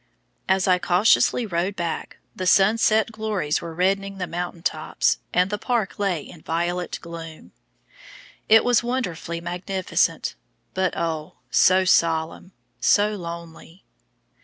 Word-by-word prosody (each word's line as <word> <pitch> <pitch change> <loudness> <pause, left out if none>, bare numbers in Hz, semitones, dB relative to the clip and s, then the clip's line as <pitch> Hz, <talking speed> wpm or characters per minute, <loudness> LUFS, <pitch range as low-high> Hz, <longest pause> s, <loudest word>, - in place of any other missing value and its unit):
As 190 0 +2
I 180 -1 +4
cautiously 205 +6 +3
rode 185 0 -2
back, 170 -3 -4 0.2
the 185 - -3
sunset 215 +3 +4
glories 215 -9 -2
were 165 -1 -7
reddening 195 +2 0
the 185 - -2
mountain 175 0 -5
tops, 155 -1 0
and 180 +2 +2
the 210 - -2
park 230 -5 -1
lay 185 -6 0
in 165 - -13
violet 175 +2 -2
gloom. 165 -1 -9 1.0
It 225 +1 +7
was 245 -2 +3
wonderfully 180 -9 -3
magnificent, 185 +2 -1 0.4
but 185 -1 -1
oh, 160 -2 -3 0.2
so 185 0 +4
solemn, 165 +1 +1 0.3
so 210 +1 +3
lonely! 170 0 -9
180 Hz, 125 wpm, -23 LUFS, 170-200 Hz, 1.0 s, It